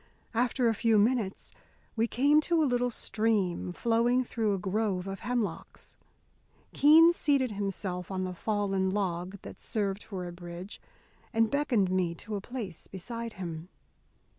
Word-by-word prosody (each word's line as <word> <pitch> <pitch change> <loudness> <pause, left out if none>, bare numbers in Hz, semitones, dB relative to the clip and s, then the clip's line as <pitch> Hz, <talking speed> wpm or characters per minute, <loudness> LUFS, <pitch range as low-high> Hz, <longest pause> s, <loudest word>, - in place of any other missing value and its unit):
After 245 +1 +1
a 225 - +3
few 225 0 +2
minutes 215 -2 0 0.4
we 230 +1 +2
came 285 +6 +4
to 330 0 +2
a - - +3
little 245 -2 +1
stream, 210 -6 -1
flowing 235 +5 +2
through 220 -4 0
a - - -2
grove 190 0 -1
of 195 -1 -5
hemlocks. 235 -8 -4 0.8
Keene 325 +4 +7
seated 280 -7 +1
himself 195 -3 -4
on 190 -1 -2
the 185 0 -3
fallen 195 0 0
log 185 -1 -2
that - - -10
served 200 -2 -2
for 190 -4 -6
a 175 - -6
bridge 175 +2 -8 0.5
and 225 -2 +2
beckoned 245 -10 +1
me 180 -2 0
to 210 +5 -6
a 200 - -3
place 215 -7 -7
beside 230 +4 -6
him. 170 -2 -6
210 Hz, 150 wpm, -29 LUFS, 185-240 Hz, 0.8 s, Keene